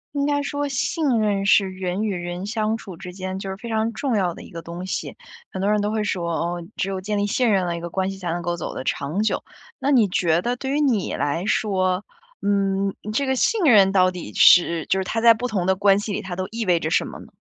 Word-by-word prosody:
应 280 - +1
该 290 0 +1
说 285 0 -2
信 280 +4 -1
任 205 -2 0
是 200 0 +5
人 185 +2 -3
与 205 -3 -1
人 175 +1 -5
相 220 +1 -1
处 195 -5 -10
之 180 +2 -9
间， 185 0 -5
就 195 0 -5
是 190 - -5
非 235 - -9
常 220 0 0
重 255 +1 -2
要 185 -4 +1
的 - - -11
一 - - -13
个 170 - -7
东 170 +2 -7
西， 190 - -4 0.4
很 190 - -5
多 200 - +1
人 210 0 +2
都 205 +1 -1
会 220 0 0
说， 175 -4 -2
哦， 170 +1 -2
只 190 - -1
有 190 -1 -3
建 210 +2 -2
立 205 0 0
信 235 +2 +2
任 190 -3 +2
了， 170 -1 -2
一 170 - -6
个 170 - -5
关 190 +2 -1
系 195 - -6
才 180 -3 -4
能 175 +1 -2
够 175 0 -2
走 170 - -5
的 - - -5
长 155 +9 -1
久。 220 - 0 0.4
那 280 - 0
你 240 -7 +5
觉 170 -2 +1
得 240 +5 -1
对 265 +2 -4
于 290 - +1
你 250 -10 +1
来 165 +6 -1
说， 190 -2 0 0.4
嗯， 195 -1 0 0.2
这 280 +5 +1
个 265 0 +1
信 445 - +1
任 205 -8 +6
到 185 -1 +4
底 180 -12 -7
是， 170 -2 +5
就 190 - +2
是 - - -1
它 220 +4 -2
在 230 0 +7
不 245 +3 -4
同 195 -5 -1
的 190 +1 +3
关 195 0 +4
系 205 0 -4
里 205 - -2
它 190 -3 -6
都 185 0 -2
意 230 +1 -3
味 175 -3 +3
着 155 - -2
什 - - +2
么 - - -8
呢？ - - -12
195 Hz, 290 characters per minute, -23 LUFS, 180-220 Hz, 0.4 s, 在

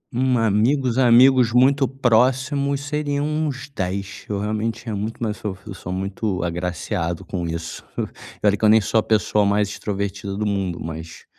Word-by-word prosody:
Hum, 130 0 +2
amigos 115 +4 +2
amigos 125 0 +6
muito 135 +2 +4
próximos 135 +3 +1
seriam 145 0 -2
uns 150 -4 -2
10. 95 +1 -4
Eu, 100 -1 -1
realmente, 110 +2 -2
tinha 110 -3 -4
muito 110 +3 -4
mais 110 -2 -2
so 100 -3 -5
eu 105 - -7
sou 90 0 -7
muito 95 0 -2
agraciado 85 0 -3
com 85 -3 -3
isso. 85 0 -5
E - - -6
olha 100 0 +5
que 105 - -10
eu 105 - +6
nem 110 +1 +7
sou 110 +2 +1
a - - 0
pessoa 105 -1 +2
mais 100 0 +2
extrovertida 100 -1 -4
do 105 - -1
mundo, 95 -4 -1
mas, 80 0 -7
105 Hz, 175 wpm, -22 LUFS, 100-130 Hz, -, nem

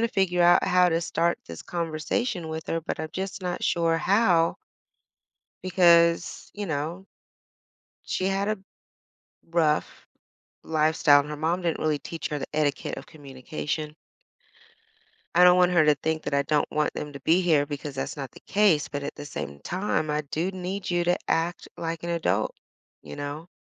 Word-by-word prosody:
to 230 - +2
figure 185 -4 +1
out 175 0 +6
how 180 0 +4
to 165 -1 +1
start 170 0 0
this 85 -1 -8
conversation 170 +3 -2
with 160 0 -5
her, 165 - -1
but 160 - -4
I'm 155 0 -4
just 190 +1 -4
not 180 -1 -3
sure 165 -1 +2
how 180 -4 +3 1.1
because, 170 -2 +3
you 205 0 -4
know 160 +4 -3 1.0
she 185 - -1
had 195 +1 0
a 215 0 0 0.9
rough 160 -3 0 0.6
lifestyle, 155 -2 +4
and 145 +1 -3
her 150 - -4
mom 165 +4 -1
didn't 170 -2 -1
really 155 -2 0
teach 165 +2 -6
her 150 -1 -3
the - - -5
etiquette 150 -2 -1
of - - -8
communication. 150 +1 -5 1.4
I 180 - +7
don't 180 0 +7
want 180 0 +4
her 170 -3 +4
to 150 - +6
think 160 0 -2
that 145 - -3
I 140 - +3
don't 150 +1 0
want 150 0 0
them 150 -1 -6
to 140 - -8
be 165 +6 +3
here 155 -5 +3
because 145 -1 -6
that's 135 - -4
not 135 -3 -6
the - - -14
case, 195 -8 +2
but 145 0 -5
at 145 - -5
the 145 - -8
same 70 - -6
time, 180 -4 -2
I 150 0 0
do 160 +5 -2
need 185 +1 -5
you 175 0 +1
to 175 +1 +2
act 165 +2 -1
like 165 0 -4
an 170 - -3
adult. 110 - 0 0.5
You - - -9
know? 145 +3 -6
165 Hz, 180 wpm, -26 LUFS, 150-180 Hz, 1.4 s, I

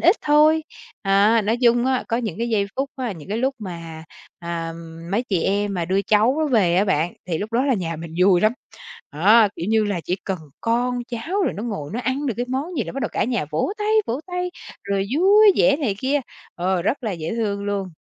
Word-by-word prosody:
ít 350 +6 +5
thôi. 305 +2 +4 0.4
À, 205 +3 +4
nói 220 +3 +1
chung 240 0 +4
á, 260 -1 +1
có 230 - 0
những 220 -7 -3
cái 235 +1 -1
giây 205 -3 +1
phút 275 +1 -1
á, 250 -5 -3
những 165 0 -12
cái 215 - -2
lúc 265 +3 0
mà, 165 -5 -8 0.3
à, 170 -1 -4 0.4
mấy 210 +5 +1
chị 185 -5 0
em 200 +1 0
mà 175 -2 -1
đưa 190 +3 0
cháu 240 +10 +2
về 180 -7 +3
á 195 - +4
bạn, 170 -3 0 0.2
thì 165 - -1
lúc 215 +2 -5
đó 245 +3 +2
là 270 - +3
nhà 165 -5 -3
mình 165 0 -8
vui 185 -2 +5
lắm. 215 +1 +3 0.6
Đó, 210 +8 +5
kiểu 170 - -4
như 220 -1 +3
là, 200 -4 -2
chỉ 180 - -1
cần 190 -2 -2 0.2
con 245 +2 0
cháu 320 - -2
rồi - - 0
nó 205 - -6
ngồi 205 -11 -4
nó 240 - -2
ăn 265 +3 -2
được 245 - -1
cái 245 - -2
món 285 +7 -3
gì 240 - 0
là - - -7
bắt 275 - -4
đầu - - -1
cả - - 0
nhà 240 -8 -1
vỗ 160 - -1
tay, 420 0 -1 0.2
vỗ 245 +5 -2
tay, 360 0 -3 0.3
rồi 200 -1 -1
vui 410 +3 +6
vẻ 280 - +4
này 250 -10 -1
kia, 275 +4 +1 0.3
ờ, 180 0 0
rất 255 +9 -1
là 215 - -1
dễ 165 -2 -4
thương 200 -3 -2
luôn. 200 -3 -3
215 Hz, 235 wpm, -22 LUFS, 190-260 Hz, 0.6 s, vui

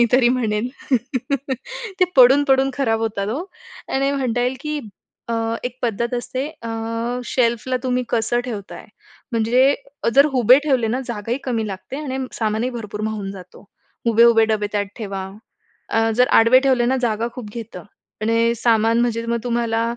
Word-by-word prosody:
मी - - +7
तरी 250 -1 +5
म्हणेन, 235 -2 0 1.3
ते - - +7
पडून 265 +3 +7
पडून 270 0 +4
खराब 225 -5 0
होतात 205 -3 -2
हो. 280 +11 -3 0.5
आणि 275 +1 +2
म्हणता 250 -4 -1
येईल, 255 +1 0
की 300 0 -3 0.5
अ, 230 - -1 0.3
एक 250 0 -5
पद्धत 235 +1 -1
असते, 255 +3 -3 0.2
अ, 230 - -5 0.6
शेल्फला 235 +1 0
तुम्ही 250 -1 0
कसं 235 +1 +1
ठेवताय? 210 -5 -7 0.5
म्हणजे 245 +5 +3 0.4
जर 280 +1 +7
उभे 255 +1 +6
ठेवले 260 -6 +2
ना, 245 +4 -1
जागाही 235 +1 -3
कमी 230 -4 -1
लागते 195 +7 -7
आणि 265 -2 -4 0.2
सामानही 220 +3 0
भरपूर 210 -3 -6
मावून 205 -3 -4
जातो. 185 -2 -12 0.5
उभे-उभे 230 0 +6
डबे 210 -1 +1
त्यात 205 -1 0
ठेवा. 195 -3 -4 0.7
अ, 225 0 +2
जर 250 +1 +4
आडवे 235 +3 +6
ठेवले 250 -3 +3
ना, 265 +1 +2
जागा 225 +1 -1
खूप 230 -5 -8
घेतं 225 -6 -7 0.4
आणि 230 +1 +2
सामान 230 0 +3
म्हणजे 230 -1 0
मग 235 0 0
तुम्हाला 230 -1 0
235 Hz, 155 wpm, -21 LUFS, 220-255 Hz, 1.3 s, मी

